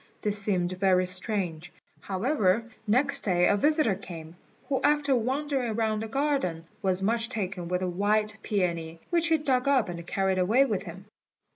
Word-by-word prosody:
This 210 -1 +2
seemed 185 -4 0
very 185 -2 +3
strange; 180 -3 -3 0.3
however, 205 0 +1 0.2
next 275 +5 +2
day 180 -3 +2
a - - +4
visitor 300 0 +3
came, 170 -4 -9 0.3
who, 270 -1 0
after 295 -2 +2
wandering 260 -1 -1
round 220 -1 0
the 225 - -4
garden, 270 - -1 0.2
was 190 -2 0
much 230 +2 +1
taken 190 -7 -4
with 180 +1 -1
a - - 0
white 210 +4 0
peony, 170 -5 -2
which 340 -1 +3
he 325 -1 +3
dug 270 -4 0
up 265 -8 +3
and 170 -1 -7
carried 190 0 0
away 225 +9 +4
with 215 -8 -1
him. 190 0 -10
205 Hz, 165 wpm, -27 LUFS, 180-255 Hz, 0.3 s, a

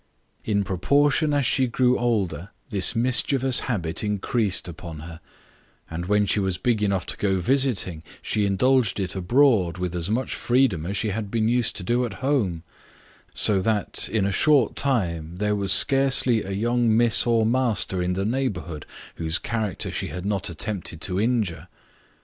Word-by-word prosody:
In 100 -2 0
proportion 145 - +1
as 145 -2 +1
she 130 +2 +2
grew 125 +1 +2
older, 100 -8 -1 0.2
this 95 -4 +3
mischievous 130 +2 +3
habit 90 -9 -2
increased 105 -1 -1
upon 85 -2 -9
her; 80 +1 -10 0.7
and 85 +2 -5
when 105 +1 +2
she 100 - +1
was 95 -3 -1
big 110 +2 0
enough 100 -4 0
to - - -2
go 95 -2 0
a - - -1
visiting, 110 - 0 0.2
she 105 -1 0
indulged 115 +2 +1
it 95 -2 -4
abroad 95 -3 +2
with 90 -1 -3
as 90 +1 -2
much 120 +4 -2
freedom 120 -10 +1
as 100 +2 -2
she 110 - -1
had 105 0 -4
been 110 0 0
used 120 -1 +1
to 95 - -5
do 120 +7 0
at 120 -5 -4
home; 100 - 0 0.7
so 100 -3 +3
that, 105 -1 -1
in 105 -4 0
a 100 - 0
short 145 +2 +2
time, 85 - -1
there 105 +1 0
was 100 -2 -2
scarcely 130 -1 +4
a 95 - -8
young 115 +3 +1
miss 120 0 +4
or 115 -2 +2
master 115 -6 0
in 90 +1 -1
the 95 +2 -2
neighbourhood 100 - -3 0.3
whose 80 0 0
character 110 -5 -3
she - - -3
had 90 +1 -7
not 100 -3 -2
attempted 85 -1 -5
to 95 0 -2
injure. 105 -9 -1
105 Hz, 175 wpm, -23 LUFS, 90-120 Hz, 0.7 s, scarcely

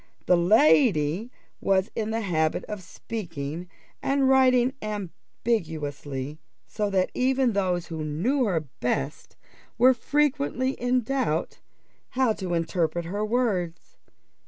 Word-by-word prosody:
That 180 - +5
lady 205 - +4 0.3
was 190 +1 +2
in 220 -1 -2
the 225 +1 -1
habit 160 -6 0
of 210 -2 -6
speaking 170 -5 -6 0.3
and 275 -1 +2
writing 260 -1 +4
ambiguously, 160 - -4 0.3
so 210 -1 -2
that 190 -2 +1
even 260 -1 +2
those 180 -3 0
who 160 -2 -5
knew 215 - 0
her 180 -7 +1
best 125 - -4 0.4
were 255 +3 +6
frequently 280 0 0
in 250 -1 0
doubt 230 - -1 0.6
how 255 -4 +3
to 185 -4 -3
interpret 170 0 -1
her 200 +5 -2
words. 215 -7 -1
200 Hz, 115 wpm, -26 LUFS, 165-250 Hz, 0.6 s, were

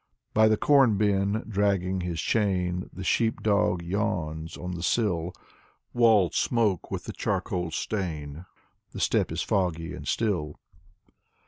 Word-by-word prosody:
By 110 0 +5
the 110 0 +3
corn 135 -7 +4
bin, 100 +1 +1
dragging 95 -3 0
his 85 -2 -3
chain, 90 -3 0
The 95 - -8
sheep 110 +4 +1
dog 100 -4 +2
yawns 80 -4 -2
on 90 +1 -5
the 85 - -5
sill. 90 -4 0 0.6
Walls 110 -8 +4
smoke 110 -7 +1
with - - -4
the - - -7
charcoal 90 -2 -2
stain. 80 -3 -4 0.5
The - - -6
steppe - - +1
is - - -2
foggy 85 -3 -1
and 75 - -8
still. 85 -7 -1
95 Hz, 135 wpm, -27 LUFS, 85-105 Hz, 0.6 s, By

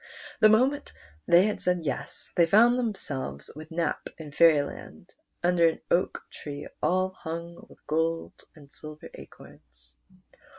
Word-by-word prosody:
The 215 - +7
moment 260 +7 +2 0.3
they 175 +3 +6
had 210 - -2
said 180 -1 +1
yes, 140 - -4
they 170 -1 +4
found 235 +7 +5
themselves 140 - -4
with 155 +1 -10
Nap 165 -2 -2
in 155 -2 -9
Fairyland 150 -2 +1 0.3
under 175 -1 +4
an 160 - -7
oak 180 - +1
tree 145 0 -8
all 185 +1 +2
hung 170 -1 -8
with - - -20
gold 160 +2 -1 0.2
and 145 -3 -17
silver 155 0 -11
acorns. 60 -4 -14
165 Hz, 135 wpm, -27 LUFS, 145-185 Hz, 0.3 s, The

